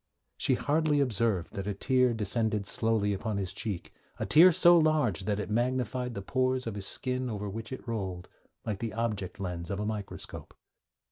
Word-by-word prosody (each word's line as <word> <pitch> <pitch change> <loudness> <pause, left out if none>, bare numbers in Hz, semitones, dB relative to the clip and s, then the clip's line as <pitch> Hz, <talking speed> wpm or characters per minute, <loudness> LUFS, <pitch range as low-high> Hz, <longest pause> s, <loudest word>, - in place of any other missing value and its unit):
'She - - +2
hardly 150 0 +1
observed 115 -8 0
that 100 0 -5
a 105 - -2
tear 125 +3 +2
descended 110 -1 0
slowly 110 -1 +1
upon 105 +1 -3
his 95 -2 -2
cheek, 100 -2 -4 0.2
a - - -2
tear 175 +4 +8
so 175 +1 +6
large 155 - +2
that 105 -1 0
it 105 - -4
magnified 125 +1 -1
the 100 - -5
pores 130 +3 0
of 115 - -3
the 100 - -5
skin 125 +5 -1
over 105 -2 -4
which 110 +4 -6
it 130 - -7
rolled, 95 -6 -4 0.4
like 105 -3 -3
the 115 -2 -4
object 105 -6 -3
lens 90 -3 -4
of 100 - -3
a 105 - -2
microscope.' 105 -2 -6
110 Hz, 185 wpm, -29 LUFS, 100-125 Hz, 0.4 s, tear